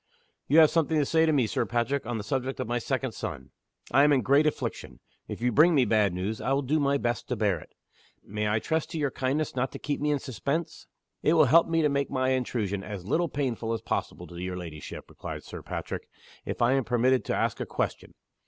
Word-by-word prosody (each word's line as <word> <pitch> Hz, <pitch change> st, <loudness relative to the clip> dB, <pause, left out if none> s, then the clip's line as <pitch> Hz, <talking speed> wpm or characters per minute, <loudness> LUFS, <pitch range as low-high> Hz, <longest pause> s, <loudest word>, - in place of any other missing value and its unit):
"You 150 Hz, -, +4 dB
have 160 Hz, -2 st, +8 dB
something 160 Hz, -1 st, +2 dB
to 150 Hz, -, +3 dB
say 160 Hz, +2 st, +3 dB
to -, -, +4 dB
me, 135 Hz, -6 st, +3 dB
Sir 110 Hz, -, 0 dB
Patrick, 120 Hz, +2 st, -1 dB
on 120 Hz, -1 st, -2 dB
the 105 Hz, -, -4 dB
subject 130 Hz, +4 st, -2 dB
of -, -, -1 dB
my 120 Hz, +1 st, 0 dB
second -, -, -2 dB
son. -, -, -6 dB, 0.4 s
I 135 Hz, +3 st, +6 dB
am 150 Hz, -, +5 dB
in 135 Hz, -4 st, +3 dB
great 140 Hz, +6 st, +4 dB
affliction. 150 Hz, -, -4 dB, 0.3 s
If -, -, -6 dB
you 125 Hz, +1 st, +2 dB
bring 160 Hz, +7 st, +5 dB
me 130 Hz, -3 st, +4 dB
bad 105 Hz, -3 st, +3 dB
news, 95 Hz, +5 st, -3 dB
I 135 Hz, -, 0 dB
will 140 Hz, +1 st, +1 dB
do 150 Hz, +4 st, +1 dB
my 140 Hz, -1 st, +2 dB
best 120 Hz, -3 st, -2 dB
to 125 Hz, -, -1 dB
bear 100 Hz, -6 st, +1 dB
it. -, -, -16 dB, 0.5 s
May 105 Hz, +1 st, -2 dB
I 105 Hz, -, +2 dB
trust 160 Hz, +8 st, -1 dB
to 165 Hz, -, -5 dB
your 145 Hz, -3 st, 0 dB
kindness 135 Hz, +3 st, -1 dB
not 130 Hz, +1 st, -1 dB
to -, -, -5 dB
keep 145 Hz, -1 st, -3 dB
me 150 Hz, -, +1 dB
in 145 Hz, -, +2 dB
suspense?" 140 Hz, +5 st, -4 dB, 0.3 s
"It 155 Hz, -, +3 dB
will 160 Hz, -3 st, +6 dB
help 165 Hz, +6 st, +5 dB
me 165 Hz, -1 st, +1 dB
to -, -, +5 dB
make 140 Hz, 0 st, 0 dB
my 130 Hz, -1 st, 0 dB
intrusion 115 Hz, -6 st, -1 dB
as 100 Hz, -4 st, -7 dB
little 165 Hz, -, +1 dB
painful 120 Hz, -6 st, -2 dB
as 115 Hz, -, -3 dB
possible -, -, -3 dB
to 85 Hz, -, -11 dB
your 90 Hz, 0 st, -4 dB
ladyship," 80 Hz, -4 st, -8 dB
replied -, -, -7 dB
Sir -, -, -8 dB
Patrick, -, -, -5 dB, 0.4 s
"if -, -, -2 dB
I 120 Hz, -, +4 dB
am 135 Hz, -1 st, +2 dB
permitted 125 Hz, +2 st, +2 dB
to -, -, -1 dB
ask -, -, 0 dB
a -, -, -2 dB
question. -, -, -3 dB
130 Hz, 240 wpm, -28 LUFS, 115-150 Hz, 0.5 s, have